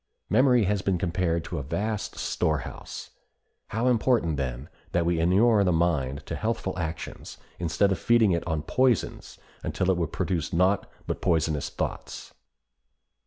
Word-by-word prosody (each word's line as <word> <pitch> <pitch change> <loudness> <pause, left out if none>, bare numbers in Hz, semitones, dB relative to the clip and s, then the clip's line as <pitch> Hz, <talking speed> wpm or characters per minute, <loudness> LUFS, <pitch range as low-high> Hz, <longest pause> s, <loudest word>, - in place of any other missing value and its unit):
Memory 125 0 +5
has 100 0 +1
been 95 -1 +1
compared 85 -2 0
to - - -4
a - - -3
vast 105 +9 -3
storehouse. 75 -1 -3 0.6
How 115 +2 -2
important, 115 - +2
then, 65 0 -3 0.3
that 85 -1 +2
we 85 -1 +1
inure 100 +6 +4
the 90 - +2
mind 75 -5 0
to - - -4
healthful 110 -4 -2
actions 80 -1 -5 0.2
instead 90 +4 +2
of 95 - 0
feeding 115 -1 +4
it 85 -1 0
on 80 -3 -1
poisons 125 +4 0 0.2
until 95 - 0
it 90 - +1
will 85 -2 0
produce 85 +1 -2
naught 95 +4 +2 0.2
but - - -3
poisonous 80 -4 +1
thoughts! - - -5
90 Hz, 150 wpm, -27 LUFS, 80-105 Hz, 0.6 s, Memory